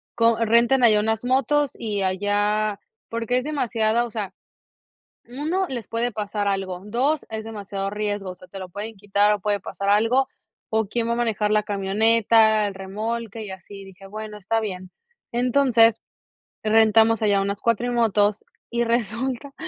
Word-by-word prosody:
Co 230 -1 +3
Renten 235 +3 +4
allá 215 -3 +6
unas 220 +1 0
motos 270 +2 +2
y 210 -3 -3
allá, 205 +2 0 0.3
porque 230 +2 -1
es 255 - -1
demasiada, 235 -5 0
o - - -7
sea, 205 -4 -4 0.9
1, 310 +10 -2
les 240 -6 -6
puede 235 +1 -1
pasar 205 -1 -3
algo, 190 -2 -2
2, 265 +8 0
es 220 0 -5
demasiado 200 -3 -5
riesgo, 205 -2 -3
o - - -7
sea, 180 0 -16
te 195 - -9
lo 185 -1 -7
pueden 210 +4 -7
quitar 205 +1 +2
o 205 - -5
puede 205 0 0
pasar 200 +1 -5
algo, 230 +6 +3 0.4
o 220 -1 +1
quién 230 +3 -2
va 235 - +1
a - - -4
manejar 220 -3 0
la 215 0 +3
camioneta, 215 +2 +3
el 195 - -7
remolque 220 +3 -4
y 205 - -8
así", 190 +1 -10
y - - -11
dije: 195 0 -14
"Bueno, 215 +1 -7
está 225 +3 0
bien". 185 -4 -5 0.4
Entonces, 240 -2 +3 0.6
rentamos 220 +1 +4
allá 200 -2 +3
unas 200 +1 -2
cuatrimotos 230 -3 +1 0.2
y 235 0 0
resulta 240 +3 -2
220 Hz, 165 wpm, -23 LUFS, 205-235 Hz, 0.9 s, allá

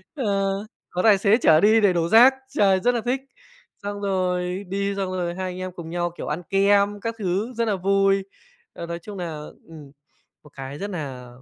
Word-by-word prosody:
ờ, 265 - -3 0.6
có 180 - -2
tài 210 -3 +6
xế 205 +3 +3
chở 155 -9 +5
đi 220 +2 +5
để 195 -3 +4
đổ 170 -1 0
rác, 245 +4 +7 0.2
trời, 195 -5 +3
rất 245 +5 +1
là 235 - -1
thích, 260 +2 0 0.6
xong 205 0 -5
rồi 185 -1 -1
đi 200 +1 -2
xong 195 -2 -2
rồi 175 -2 -3
hai 185 0 -4
anh 180 - -8
em 185 0 -5
cùng 170 -2 -9
nhau, 175 0 -2
kiểu, - - -6
ăn 150 +4 -3
kem 200 +1 +3
các 230 0 -3
thứ 200 +6 -2
rất 230 0 -1
là 210 - +1
vui. 195 +1 +2 0.5
Ờ, 170 - -7
nói 170 0 -5
chung 200 +2 -9
là 155 -4 -5 0.2
ừm, 150 -4 -12 0.5
một 150 - -17
cái 135 +1 -7
rất 205 +1 -5
nà 135 -8 -6
190 Hz, 210 wpm, -23 LUFS, 175-205 Hz, 0.6 s, rác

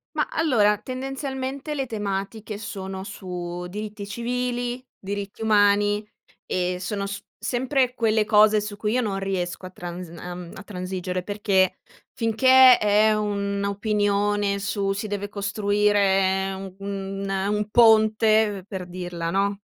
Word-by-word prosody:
Ma, - - +1
allora, 240 - +3
tendenzialmente 270 +3 -4
le 270 -2 -1
tematiche 205 -1 -4
sono 190 -3 -6
su 180 -2 -6
diritti 210 +1 -6
civili, 245 +2 -2
diritti 200 +2 -5
umani 205 -1 +3 0.4
e 180 0 -1
sono 200 +2 -3
s 200 +1 -5 0.2
sempre 250 +2 +1
quelle 220 -3 +2
cose 215 0 +5
su 210 0 -5
cui 210 +1 -2
io 255 - +2
non 205 -4 -2
riesco 185 -2 -3
a 185 - -6
trans 175 -1 -7
uhm, 175 +1 -8
a 195 - -9
transigere, 185 -2 -4
perché 200 -2 +1 0.4
finché 255 +3 +6
è 210 +1 +4
un'opinione 205 0 0
su: 200 -1 -1
si 200 +2 -4
deve 205 0 -4
costruire 200 -2 +1
un 190 -1 -8
un 195 0 -4
ehm, 195 +1 0
un 210 0 -1
ponte, 215 -3 +4
per 190 -3 -6
dirla, 175 -2 -4
no, 200 +2 0
205 Hz, 130 wpm, -24 LUFS, 195-220 Hz, 0.4 s, finché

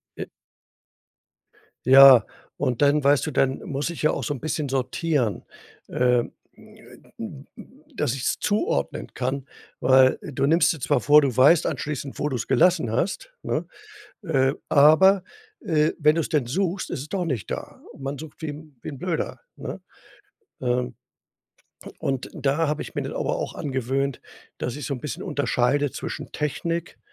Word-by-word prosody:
äh. - - -5 1.6
Ja, 130 -2 +9 0.3
und 125 0 -1
dann, 145 +1 +4
weißt 140 0 +3
du - - -2
dann 135 0 +1
muss 140 +3 -3
ich 170 - -6
ja 155 - +3
auch - - -3
so 145 - -2
'n 135 - -7
bisschen 155 0 -2
sortieren. 130 - -1 0.4
Ähm, 125 -1 +1 1.6
dass - - 0
ich 130 - -6
es - - 0
zuordnen 205 - -1
kann. 130 +2 -3 0.3
Weil 130 0 +5
du 140 -1 -2
nimmst 165 +3 +4
dir 160 - -9
zwar - - +2
vor, 150 +1 +6
du 135 -5 -1
weißt 145 +5 +5
anschließend, 140 -2 -4
wo 150 - 0
du's 125 -5 -3
gelassen 170 -10 +3
hast, 185 - -2
ne, - - -2 0.6
äh, 135 -5 +2 0.2
aber, 175 +7 +6 0.4
äh, 155 -6 +2
wenn 150 +1 +4
du's 165 -2 -1
dann 145 -6 0
suchst, 185 +6 -1
ist 155 - -4
es 150 - -9
doch 190 -3 -2
nicht 130 -10 -3
da. - - -6
Und - - -15
man 135 +1 -3
sucht 155 +2 -11
wie 155 -2 -4 0.3
wie - - -6
'n 140 - -8
Blöder, 175 +1 -3
ne? - - -7 0.8
Ähm 125 0 -1 1.1
und 135 -2 -2
da 145 +2 0
habe 150 - -1
ich - - -10
mir - - -2
das - - -5
aber - - -1
auch - - -4
angewöhnt, 135 0 -2 0.4
dass 120 - -3
ich 145 - -6
so 140 - -2
'n 125 - -8
bisschen 155 +7 -5
unterscheide 145 -3 0
zwischen - - -6
Technik, 165 +3 -3
140 Hz, 160 wpm, -24 LUFS, 130-155 Hz, 1.6 s, Ja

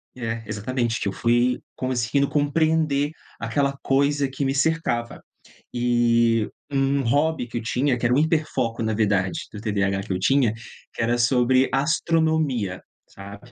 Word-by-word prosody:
é, 115 -2 -4
exatamente, 115 +2 -2
que - - -2
eu - - 0
fui 120 +3 +1 0.2
conseguindo 130 +2 0
compreender 150 0 +1 0.3
aquela 140 +4 -1
coisa 140 +1 +2
que 135 +2 -4
me 135 0 0
cercava. 135 -5 -1 0.5
Eh, 115 -2 +2 0.2
um 135 0 +1
hobby 145 +3 +1
que 120 - -5
eu - - -2
tinha 130 +3 +1
que 120 - -3
era 120 - +2
um 130 - +3
hiperfoco, 150 -8 0
na 110 0 0
verdade, 100 -4 +1
do 105 - -7
TDAH, 100 -3 0
que 95 - -4
eu 90 - -2
tinha 125 +2 +2 0.4
era 120 +1 +1
sobre 125 +2 +3
astronomia 150 - 0 0.3
sabe? 100 +5 -12
125 Hz, 145 wpm, -23 LUFS, 115-140 Hz, 0.5 s, um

